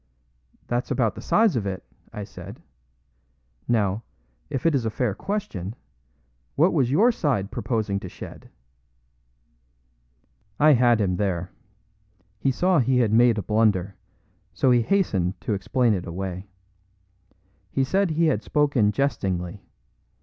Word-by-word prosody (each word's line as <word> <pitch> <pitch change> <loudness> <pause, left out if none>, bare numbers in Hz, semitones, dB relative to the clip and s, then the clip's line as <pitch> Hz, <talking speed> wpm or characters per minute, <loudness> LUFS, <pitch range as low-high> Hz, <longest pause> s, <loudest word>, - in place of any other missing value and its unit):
"That's 120 +1 -2
about 115 -5 +1
the - - -9
size 220 -6 +3
of 105 -4 -1
it," 95 -1 -4 0.3
I 105 - -6
said. 100 +2 -10 1.1
"Now, 105 -3 +1 0.5
if 135 -1 -4
it 165 - +4
is 135 -4 +1
a 110 - 0
fair 110 -1 -1
question, 110 - -4 0.8
what 165 +6 +3
was 135 -7 +2
your 205 - +4
side 130 - -1
proposing 110 -5 -1
to 95 - -8
shed?" - - -11 2.1
I 150 +1 +6
had 120 -2 +4
him 90 -3 0
there. 90 -3 -2 0.9
He 135 - +1
saw 180 +6 +2
he 130 0 +2
had 115 -4 +2
made 120 0 +5
a 105 - -2
blunder, 100 -2 +1 0.6
so 130 - +3
he 120 -1 +4
hastened 110 - 0
to 110 - -2
explain 115 +4 +1
it 90 -3 -3
away. 95 +2 -5 1.2
He 135 - 0
said 190 +7 +1
he 165 +1 +1
had 155 - +1
spoken 140 -8 +2
jestingly. 95 -8 -2
115 Hz, 135 wpm, -24 LUFS, 100-140 Hz, 2.1 s, I